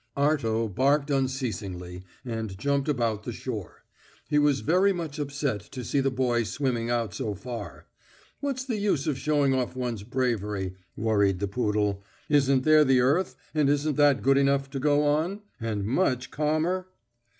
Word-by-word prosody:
Arto 125 -6 +1
barked 140 +8 +1
unceasingly, 110 -10 -3 0.2
and 110 -5 -4
jumped 140 +5 0
about 115 -6 0
the - - -4
shore. - - -6 0.5
He 150 -1 +3
was 145 -2 +3
very 185 +5 +3
much 165 -4 -5
upset 140 -5 -2
to 130 -2 -5
see 140 - 0
the 135 0 +2
boy 125 -2 +1
swimming 120 0 -1
out 115 -5 -1
so 105 +2 -3
far. 105 - -7 0.5
"What's 270 -2 -3
the 240 -5 -2
use 200 -9 +1
of 140 -4 -1
showing 145 -2 +2
off 130 -1 -1
one's 120 -4 -3
bravery?" 105 -6 -2 0.2
worried 100 -3 +2
the 100 +2 -2
poodle. 105 -2 0 0.3
"Isn't 140 -3 +3
there 155 0 +6
the 135 -2 +4
earth, 145 +9 +2 0.2
and 150 -3 +2
isn't 145 0 +1
that 145 -2 +4
good 135 +1 +4
enough 140 0 +1
to 135 - -3
go 145 +1 +3
on, 160 +8 0 0.2
and 110 -4 -2
much 125 - 0
calmer?" 155 +5 0
135 Hz, 160 wpm, -27 LUFS, 115-145 Hz, 0.5 s, there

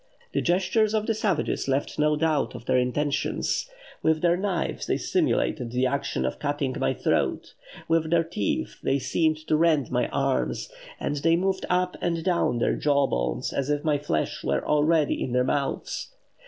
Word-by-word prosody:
The - - +1
gestures 205 +5 +2
of 215 -1 0
the 225 - +1
savages 200 -10 -1
left 135 +2 -1
no 150 0 +3
doubt 150 -4 0
of 120 -1 -9
their 130 0 +3
intentions; 145 - -1 0.3
with 160 -1 +2
their 170 0 +4
knives 185 -2 -2
they - - +1
simulated 120 - 0
the 125 +2 0
action 140 - -1
of 65 - -3
cutting 145 -3 -1
my 65 - +1
throat, - - 0 0.3
with 165 -1 +2
their 165 0 +3
teeth 105 - -2
they 135 - +1
seemed 155 +4 +1
to 155 - +2
rend 155 -3 +2
my - - +1
arms, - - -1 0.3
and 145 - -2
they 165 +4 +3
moved 190 +2 -1
up 180 0 +1
and 170 -2 -1
down 175 -8 +1
their 120 - +1
jawbones 135 - 0
as 140 0 -1
if 145 0 0
my 150 -3 +1
flesh 80 - -2
were 70 0 0
already 150 0 +2
in 125 - -3
their 125 0 +3
mouths.... 140 - -2
150 Hz, 175 wpm, -26 LUFS, 135-170 Hz, 0.3 s, their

